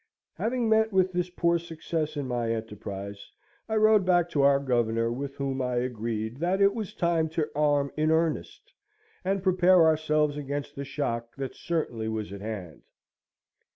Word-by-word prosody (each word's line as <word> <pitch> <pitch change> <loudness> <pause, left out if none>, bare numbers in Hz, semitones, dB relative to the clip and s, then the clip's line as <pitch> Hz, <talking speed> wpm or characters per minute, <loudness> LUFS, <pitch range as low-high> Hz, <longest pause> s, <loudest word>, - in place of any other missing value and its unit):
Having 240 0 -1
met 220 0 +3
with 190 -1 +3
this 180 0 -1
poor 170 -1 +1
success 160 -2 -4
in 140 -2 -2
my 120 -2 -1
enterprise, 100 -3 -6 0.4
I 220 - 0
rode 215 -1 +5
back 175 -2 +2
to 145 - +2
our 140 0 +5
Governor, 115 -3 +1
with 140 +3 -5
whom 135 -1 -2
I 125 -1 -1
agreed 115 -2 -2
that 175 +5 0
it 200 0 +5
was 220 -4 -5
time 165 -2 +1
to 155 -2 0
arm 145 -1 +2
in 155 0 +1
earnest, 160 0 -1 0.5
and 190 0 -1
prepare 185 -2 +5
ourselves 155 -2 +2
against 145 0 -4
the 140 - -5
shock 120 -4 -3
that 135 -2 -5
certainly 125 -10 -2
was 110 -2 -3
at 100 - -8
hand. 100 -8 -6
145 Hz, 165 wpm, -27 LUFS, 120-175 Hz, 0.5 s, rode